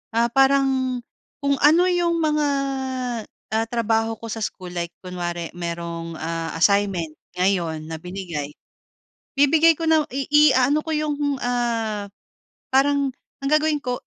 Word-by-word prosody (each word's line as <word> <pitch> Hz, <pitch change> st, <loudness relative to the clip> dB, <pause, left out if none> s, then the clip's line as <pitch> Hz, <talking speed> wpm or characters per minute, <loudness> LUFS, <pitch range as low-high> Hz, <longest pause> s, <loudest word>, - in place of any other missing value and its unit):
ah, 235 Hz, +1 st, +3 dB
parang 270 Hz, -1 st, +3 dB, 0.4 s
kung 280 Hz, -1 st, +2 dB
ano 325 Hz, +5 st, +6 dB
yung 345 Hz, -1 st, +1 dB
mga, 300 Hz, -1 st, +2 dB, 1.1 s
ah, 220 Hz, +1 st, +2 dB
trabaho 225 Hz, -1 st, +1 dB
ko 230 Hz, -, -7 dB
sa 225 Hz, 0 st, -3 dB
school, 185 Hz, -2 st, -7 dB
like 170 Hz, -1 st, -4 dB
kunwari 175 Hz, -2 st, -4 dB
mayroong, 170 Hz, -1 st, -5 dB
ah, 165 Hz, 0 st, -3 dB
assignment 195 Hz, -4 st, +2 dB, 0.2 s
ngayon 170 Hz, -5 st, 0 dB
na 160 Hz, -, -4 dB
binigay, 175 Hz, -5 st, -5 dB, 0.8 s
bibigay 320 Hz, +3 st, +5 dB
ko 330 Hz, -, -5 dB
na 315 Hz, -1 st, +4 dB
iaano 280 Hz, 0 st, +4 dB
ko 320 Hz, -, -2 dB
yung, 290 Hz, -2 st, -1 dB
ah, 230 Hz, -4 st, -1 dB, 0.7 s
parang 280 Hz, 0 st, +3 dB, 0.3 s
ang 275 Hz, -, 0 dB
gagawin 305 Hz, 0 st, +3 dB
ko, 250 Hz, -1 st, -3 dB
235 Hz, 125 wpm, -23 LUFS, 180-285 Hz, 1.1 s, ano